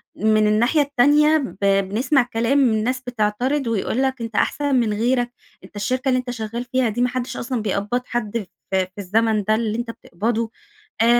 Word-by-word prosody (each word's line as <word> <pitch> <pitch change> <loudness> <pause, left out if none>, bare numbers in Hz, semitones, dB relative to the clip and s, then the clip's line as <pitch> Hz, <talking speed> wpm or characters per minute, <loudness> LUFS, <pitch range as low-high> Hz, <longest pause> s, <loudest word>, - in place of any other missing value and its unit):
من 215 +1 +3
الناحية 240 +8 +3
التانية 290 +3 +4
ب 265 -8 -5
بنسمع 200 +8 +2
كلام 235 +5 +2
من 225 -6 +3
ناس 255 +2 -1
بتعترض 245 +4 0
ويقول 230 +2 0
لك: 265 -2 -1
"أنت 225 -2 -5
أحسن 285 +4 +1
من 230 -4 +2
غيرك، 240 +2 +1 0.3
أنت - - -16
الشركة 255 +6 -1
اللي 255 - +3
أنت 250 -1 -5
شغال 230 0 -4
فيها 250 -1 +1
دي 230 +3 -2
ما 250 - +3
حدش 255 0 -4
أصلًا 240 -2 -3
بيقبض 210 +4 -1
حد 235 -1 -2
في 205 - -5 0.4
في 185 - -22
الزمن 215 +2 +1
ده 215 +2 +2
اللي 220 -1 -1
أنت 235 -1 -3
بتقبضه، 225 +3 -3 0.5
آآ، 230 - +4
235 Hz, 190 wpm, -21 LUFS, 215-255 Hz, 0.5 s, التانية